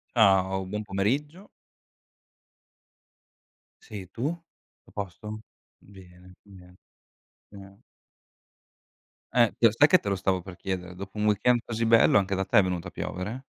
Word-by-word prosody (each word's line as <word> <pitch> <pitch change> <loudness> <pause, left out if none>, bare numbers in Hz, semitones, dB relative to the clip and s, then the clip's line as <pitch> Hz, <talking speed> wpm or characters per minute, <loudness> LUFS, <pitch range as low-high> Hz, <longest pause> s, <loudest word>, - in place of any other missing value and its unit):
Ciao. 95 -3 +3
Buon 105 +3 -4
pomeriggio. 135 - -2 2.4
Sì, 100 -3 -8
tu? 120 - -6 0.6
Tutto - - -22
a - - -20
posto? 105 +2 -7 0.4
Bene, 90 -2 -17
bene. 90 -3 -16 0.8
Eh 100 -1 -14 1.5
Eh, 120 -3 +4
io 115 - +6
sai 130 +7 +5
che 185 +2 +5
te 100 - -4
lo 100 - +1
stavo 95 -1 0
per 95 0 -10
chiedere, 90 -1 -5
dopo 100 +3 -8
un 105 - 0
weekend 105 +4 +3
così 115 0 -3
bello 115 -2 +5
anche 100 0 0
da 95 0 -1
te - - +2
è 100 - +7
venuto 90 -1 -3
a - - -9
piovere? 105 +11 -5
100 Hz, 140 wpm, -27 LUFS, 95-110 Hz, 2.4 s, è